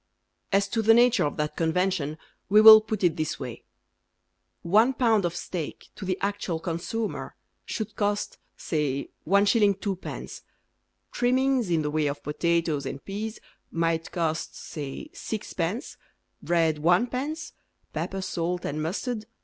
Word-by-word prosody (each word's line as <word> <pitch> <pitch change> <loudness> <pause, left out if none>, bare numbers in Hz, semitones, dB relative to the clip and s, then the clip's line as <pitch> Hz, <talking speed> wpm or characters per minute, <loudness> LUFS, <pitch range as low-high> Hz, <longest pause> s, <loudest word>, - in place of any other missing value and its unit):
As 200 0 +3
to 225 - 0
the 225 +1 +6
nature 245 -3 +5
of 145 - -3
that 150 0 -2
convention 165 -2 0 0.3
We 210 +2 +6
will 220 0 +11
put 215 -2 -4
it 175 -3 +3
this 155 -1 -2
way: 125 -4 -7 1.0
One 220 +9 +4
pound 225 -6 +3
of 175 - -2
steak 165 -5 -5
To 195 - -7
the 185 0 -1
actual 195 -4 -2
consumer 175 +7 -4 0.3
Should 220 -1 -4
cost, 205 0 -1 0.2
say, 145 -4 -2 0.2
1s. 200 +1 +4
2d. 195 -3 -5 0.7
Trimmings 255 -2 +2
In 165 -3 +2
the 150 - -2
way 155 -1 +1
of 140 0 -4
potatoes 160 -2 0
and 135 - -7
peas 215 +3 -5 0.3
might 165 0 -1
cost, 165 -2 -2
say, 145 - -7
6d., 210 - -4 0.4
Bread, 165 -3 +2
1d., 250 - 0 0.4
Pepper, 195 0 -3
salt, 175 -1 -2
and 150 +2 -2
mustard, 215 +9 -2
1d. 215 - -13
185 Hz, 140 wpm, -26 LUFS, 160-220 Hz, 1.0 s, will